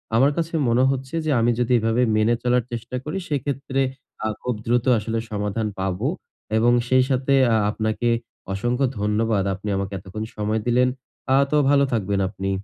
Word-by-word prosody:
আমার 135 Hz, +5 st, +5 dB
কাছে 165 Hz, 0 st, -2 dB, 0.2 s
মনে 120 Hz, +2 st, +3 dB
হচ্ছে 135 Hz, +2 st, -4 dB
যে, 155 Hz, -, +1 dB
আমি 115 Hz, +1 st, +3 dB
যদি 125 Hz, 0 st, 0 dB
এভাবে 115 Hz, +2 st, +1 dB, 0.2 s
মেনে 110 Hz, +2 st, +3 dB
চলার 125 Hz, 0 st, +2 dB
চেষ্টা 120 Hz, +2 st, -5 dB
করি। 150 Hz, +7 st, -4 dB
সেক্ষেত্রে 135 Hz, -1 st, -1 dB, 0.4 s
আ -, -, +2 dB
খুব 125 Hz, -2 st, -2 dB
দ্রুত 120 Hz, +1 st, +1 dB
আসলে 115 Hz, +1 st, -2 dB
সমাধান 105 Hz, +1 st, -2 dB
পাবো 95 Hz, -1 st, -1 dB, 0.5 s
এবং 120 Hz, +2 st, +4 dB, 0.2 s
সেই 130 Hz, 0 st, +4 dB
সাথে 130 Hz, +1 st, +1 dB, 0.2 s
আ -, -, +4 dB, 0.2 s
আপনাকে 110 Hz, +2 st, -1 dB, 0.4 s
অসংখ্য 120 Hz, +7 st, 0 dB
ধন্যবাদ। 105 Hz, -1 st, +1 dB
আপনি 100 Hz, +2 st, -6 dB
আমাকে 100 Hz, 0 st, -3 dB
এতক্ষণ 95 Hz, +4 st, -6 dB
সময় 105 Hz, +1 st, -1 dB
দিলেন। 125 Hz, +1 st, +4 dB, 0.5 s
আ -, -, +6 dB, 0.2 s
তো 150 Hz, -, +3 dB
ভালো 140 Hz, -1 st, +5 dB
থাকবেন 100 Hz, -2 st, 0 dB
আপনি। 95 Hz, -1 st, -4 dB
115 Hz, 170 wpm, -23 LUFS, 105-130 Hz, 0.5 s, আ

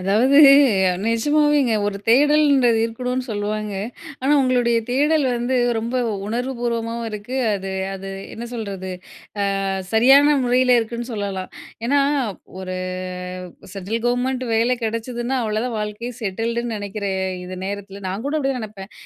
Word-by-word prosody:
அதாவது, 225 Hz, +10 st, +3 dB, 0.7 s
நெஜமாவேங்க. 290 Hz, +2 st, +2 dB
ஒரு 200 Hz, -1 st, -2 dB
தேடல்ன்றது 280 Hz, -2 st, +4 dB
இருக்கணும்னு 250 Hz, +2 st, -3 dB
சொல்லுவாங்க. 210 Hz, 0 st, -3 dB, 0.5 s
ஆனா, 270 Hz, -, +1 dB
உங்களுடைய 245 Hz, -2 st, +2 dB
தேடல் 295 Hz, +3 st, +2 dB
வந்து 240 Hz, +2 st, -1 dB, 0.2 s
ரொம்ப 235 Hz, +3 st, -2 dB, 0.3 s
உணர்வு 245 Hz, +4 st, -2 dB
பூர்வமாவும் 230 Hz, -1 st, -2 dB
இருக்கு. 210 Hz, +4 st, -6 dB, 0.2 s
அது 195 Hz, -1 st, -3 dB, 0.2 s
அது 195 Hz, 0 st, -7 dB, 0.3 s
என்ன 235 Hz, -, -6 dB
சொல்றது 195 Hz, -4 st, -5 dB, 0.7 s
அ -, -, -2 dB, 0.3 s
சரியான 275 Hz, +6 st, +6 dB
முறையில 250 Hz, 0 st, +4 dB
இருக்குன்னு 235 Hz, +2 st, -4 dB
சொல்லலாம். 200 Hz, -3 st, -4 dB, 0.4 s
ஏனா, 280 Hz, +3 st, +3 dB, 0.6 s
ஒரு 185 Hz, -1 st, -5 dB, 1.0 s
சென்ட்ரல் 200 Hz, +4 st, -3 dB
கவர்மெண்ட் 250 Hz, +1 st, 0 dB
வேல 235 Hz, +3 st, +2 dB
கெடச்சதுன்னா, 240 Hz, +3 st, -2 dB
அவ்வளோதான் 220 Hz, +3 st, -2 dB
வாழ்க்கையே 210 Hz, +3 st, -4 dB
செட்டில்டுன்னு 230 Hz, +3 st, -2 dB
நெனைக்கிற 200 Hz, 0 st, -4 dB, 0.3 s
இந்த 185 Hz, 0 st, -7 dB
நேரத்தில 200 Hz, 0 st, -6 dB
நான் 195 Hz, +6 st, -4 dB
கூட 310 Hz, +2 st, 0 dB
அப்டிதான் 270 Hz, -3 st, -1 dB
நெனப்பேன். 205 Hz, -2 st, -9 dB
230 Hz, 125 wpm, -21 LUFS, 210-255 Hz, 1.0 s, சரியான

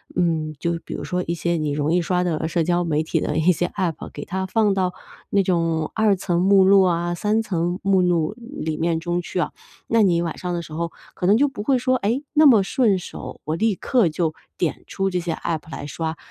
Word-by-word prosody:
嗯， 160 Hz, -3 st, 0 dB
就 170 Hz, -1 st, -1 dB
比 -, -, -6 dB
如 -, -, -5 dB
说 180 Hz, 0 st, -2 dB
一 170 Hz, -, -1 dB
些 170 Hz, +1 st, -1 dB
你 155 Hz, -2 st, -1 dB
容 150 Hz, +3 st, 0 dB
易 180 Hz, -, +3 dB
刷 180 Hz, +1 st, 0 dB
的 160 Hz, -2 st, -1 dB
社 165 Hz, +1 st, 0 dB
交 175 Hz, +2 st, +1 dB
媒 155 Hz, -2 st, 0 dB
体 160 Hz, +1 st, -1 dB
的 150 Hz, -, -1 dB
一 160 Hz, +3 st, +4 dB
些 175 Hz, 0 st, 0 dB
App 175 Hz, -4 st, -3 dB
给 145 Hz, -, -7 dB
它 190 Hz, 0 st, -3 dB
放 210 Hz, 0 st, +2 dB
到 185 Hz, -2 st, 0 dB, 0.4 s
那 200 Hz, -1 st, +3 dB
种 165 Hz, -3 st, 0 dB
2 220 Hz, -2 st, +3 dB
层 175 Hz, -2 st, -1 dB
目 195 Hz, +1 st, +5 dB
录 195 Hz, +1 st, +6 dB
啊， 175 Hz, -1 st, +1 dB
3 210 Hz, +5 st, 0 dB
层 175 Hz, -2 st, -1 dB
目 195 Hz, -1 st, +3 dB
录， 175 Hz, -1 st, +1 dB
里 230 Hz, -, -5 dB
面 165 Hz, 0 st, 0 dB
中 175 Hz, +1 st, -1 dB
去 180 Hz, -, -4 dB
啊。 -, -, 0 dB, 0.3 s
那 230 Hz, 0 st, +2 dB
你 175 Hz, -4 st, +3 dB
晚 165 Hz, -2 st, -3 dB
上 180 Hz, -, -3 dB
的 170 Hz, -, -2 dB
时 155 Hz, -, -11 dB
候 170 Hz, +1 st, -3 dB, 0.2 s
可 180 Hz, -, -2 dB
能 205 Hz, +3 st, +5 dB
就 290 Hz, -, +4 dB
不 265 Hz, -7 st, -6 dB
会 260 Hz, +4 st, +3 dB
说， 255 Hz, +1 st, +1 dB
哎， 235 Hz, +5 st, 0 dB
那 310 Hz, 0 st, +5 dB
么 230 Hz, -8 st, +7 dB
顺 210 Hz, -1 st, +2 dB
手， -, -, -9 dB
我 155 Hz, -, -2 dB
立 215 Hz, +4 st, +1 dB
刻 240 Hz, 0 st, +2 dB
就 160 Hz, 0 st, -1 dB, 0.2 s
点 170 Hz, -4 st, -2 dB
出 195 Hz, 0 st, -1 dB
这 180 Hz, -1 st, -1 dB
些 170 Hz, -1 st, -2 dB
App 160 Hz, 0 st, -4 dB
来 145 Hz, -, -6 dB
刷， 160 Hz, +2 st, -4 dB
175 Hz, 260 characters per minute, -22 LUFS, 165-195 Hz, 0.4 s, 么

